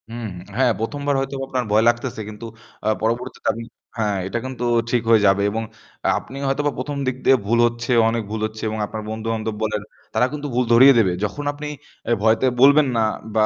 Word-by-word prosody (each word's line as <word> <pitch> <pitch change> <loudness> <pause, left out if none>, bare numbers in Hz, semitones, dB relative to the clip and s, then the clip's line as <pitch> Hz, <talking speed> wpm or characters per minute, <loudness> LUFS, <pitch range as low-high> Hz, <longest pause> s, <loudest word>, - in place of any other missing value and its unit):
হুম। 115 0 -5 0.3
হ্যাঁ, 130 -2 +4
১ম 115 +6 -3
বার 145 - +2
হয়তোবা 135 0 -3
আপনার 130 -1 -1
ভয় 110 +1 +4
লাগতেছে। 120 -1 -2
কিন্তু 105 +2 -9 0.4
আ - - +4
পরবর্তীতে 120 +3 -2
আপনি 115 - -7 0.3
হ্যাঁ, 105 -3 0
এটা 110 +5 -2
কিন্তু 130 -2 -5 0.3
ঠিক 120 -1 +2
হয়ে 115 -2 +6
যাবে 100 +1 +3
এবং 115 +2 -2 0.4
আ - - +4
আপনি 135 - -11
হয়তোবা 145 +2 0
১ম 140 +3 -4
দিক 130 - 0
দিয়ে 135 - +7
ভুল 115 +2 +2
হচ্ছে, 120 +1 -4 0.2
অনেক 115 0 -1
ভুল 110 - -3
হচ্ছে 110 0 -7
এবং 110 0 -4
আপনার 110 +1 -6
বন্ধু-বান্ধব 110 0 -3
বলে 110 0 -1 0.4
তারা - - +4
কিন্তু 150 0 -4
ভুল 125 0 +2
ধরিয়ে 130 +4 +8
দেবে। 95 -5 +2
যখন 105 +8 -5
আপনি 150 +1 -7 0.4
এ - - +1
ভয়তে 110 +3 +3 0.2
বলবেন 145 +2 +6
না 115 - +3 0.3
বা 110 -1 +4
115 Hz, 205 wpm, -21 LUFS, 110-130 Hz, 0.4 s, ধরিয়ে